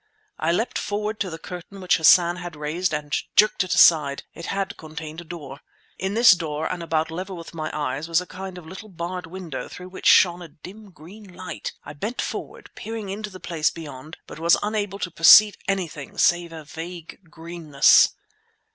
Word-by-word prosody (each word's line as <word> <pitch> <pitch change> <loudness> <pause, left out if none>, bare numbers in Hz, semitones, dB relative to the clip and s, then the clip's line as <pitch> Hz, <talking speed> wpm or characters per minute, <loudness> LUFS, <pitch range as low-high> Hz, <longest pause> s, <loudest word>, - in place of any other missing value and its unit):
I 160 +1 +1
leapt 225 +8 -1
forward 210 +1 -3
to 195 - -2
the 160 - -7
curtain 180 +4 -9
which 185 -1 +2
Hassan 175 +2 +5
had 175 -2 -7
raised 155 +5 -2
and 150 -1 -2 0.2
jerked 210 -2 +4
it 185 - -1
aside; 150 -4 +5
it 170 - -8
had 195 -1 -3
concealed 155 +1 -8
a - - -11
door. 155 -5 -9 0.4
In 190 +2 -2
this 230 +1 +8
door 160 -4 -1
and 180 -1 -4
about 160 -1 -1
level 185 +2 -6
with 165 0 -10
my 155 -1 -4
eyes 145 0 -3
was 165 0 +2
a 180 - -6
kind 185 0 -8
of 175 - -11
little 190 +6 -10
barred 180 0 -6
window 165 -8 -7
through 180 0 -10
which 185 - -4
shone 175 -1 +5
a 175 - -8
dim 195 +7 -13
green 190 +4 -14
light. - - -6
I - - -9
bent 210 +12 -5
forward, - - -5
peering 220 -3 -6
into 210 +2 -5
the 185 -2 -11
place 160 -4 0
beyond, 150 -2 -10
but - - -11
was 170 +1 +4
unable 205 -2 -2
to 180 -3 -4
perceive 205 +6 +8
anything 175 -7 -4
save 175 -1 +2
a 160 -1 -9
vague 165 +3 -9
greenness. 165 -4 +3
175 Hz, 190 wpm, -23 LUFS, 160-190 Hz, 0.4 s, this